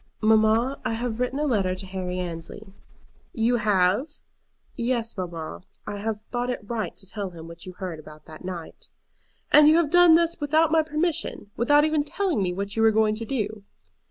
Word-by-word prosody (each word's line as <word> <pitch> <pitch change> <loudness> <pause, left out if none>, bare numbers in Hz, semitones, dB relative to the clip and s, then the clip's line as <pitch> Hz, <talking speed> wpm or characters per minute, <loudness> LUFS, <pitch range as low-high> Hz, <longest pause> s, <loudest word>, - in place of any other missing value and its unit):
"Mamma, 220 +4 +3
I - - -1
have 230 0 -3
written 250 +2 -1
a 300 - 0
letter 195 -9 +1
to 190 +1 -7
Harry 185 -1 -4
Annesley." 180 +3 -7 0.6
"You 240 +1 +2
have?" 205 +3 +2 0.7
"Yes, 235 -1 -1
mamma; 170 -4 -6 0.2
I 205 - -5
have 215 +1 -4
thought 245 0 -2
it 225 -4 -4
right 225 -2 -3
to 195 - -9
tell 200 0 -5
him 165 -2 -11
what 170 +2 -11
you 185 - -7
had - - -28
heard 175 -4 -4
about 155 0 -13
that 155 +2 -12
night." 180 -3 -8 0.6
"And 300 0 +8
you 315 - +5
have 325 -4 +1
done 350 -2 +7
this 335 0 +2
without 310 +2 +3
my 320 0 +5
permission, 310 -7 -2
without 290 +6 +4
even 310 -1 +1
telling 340 - -1
me 180 -2 0
what 200 +3 -4
you 225 - +1
were 225 - +6
going 220 0 +2
to 225 +1 -5
do?" 215 -4 -3
220 Hz, 195 wpm, -25 LUFS, 190-280 Hz, 0.7 s, And